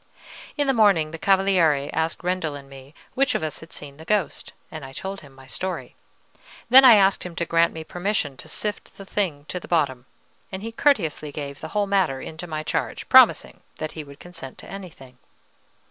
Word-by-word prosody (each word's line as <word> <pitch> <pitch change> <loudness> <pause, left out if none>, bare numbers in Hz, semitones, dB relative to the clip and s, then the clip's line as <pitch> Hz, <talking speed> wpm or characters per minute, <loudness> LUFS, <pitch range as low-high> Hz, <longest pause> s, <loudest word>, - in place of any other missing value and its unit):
In 290 - +1
the 270 - +2
morning 195 -9 +4
the 165 - -7
Cavaliere 180 -7 +3
asked 160 +3 -1
Rendel 180 -4 -1
and 140 -1 -10
me 135 +1 -14 0.2
which 275 +2 +2
of - - -1
us 155 - -3
had 165 - -13
seen 140 -1 -8
the 160 - -11
ghost, 200 0 -1 0.2
and 155 -2 -7
I 135 0 -9
told 195 +6 -6
him 145 -3 -15
my 135 0 -16
story; 185 +8 -5 0.8
then 265 +2 +10
I 245 -4 +10
asked 195 -1 +3
him 180 -2 -7
to 170 - -1
grant 170 0 +3
me 160 - -7
permission 175 -5 -2
to - - -11
sift 210 -1 -4
the 195 - -10
thing 170 -8 -2
to 180 - -3
the - - -12
bottom; 130 -7 0 0.4
and 190 +1 -6
he 225 - -5
courteously 185 - +1
gave 140 -1 -6
the - - -6
whole 205 - +3
matter 190 -9 +1
into 160 +5 -8
my 155 -1 -4
charge, - - -3
promising - - +6 0.2
that 155 - -5
he 155 - -7
would 140 0 -14
consent 165 -7 -9
to - - -11
anything. 155 -10 -11
165 Hz, 205 wpm, -24 LUFS, 145-195 Hz, 0.8 s, then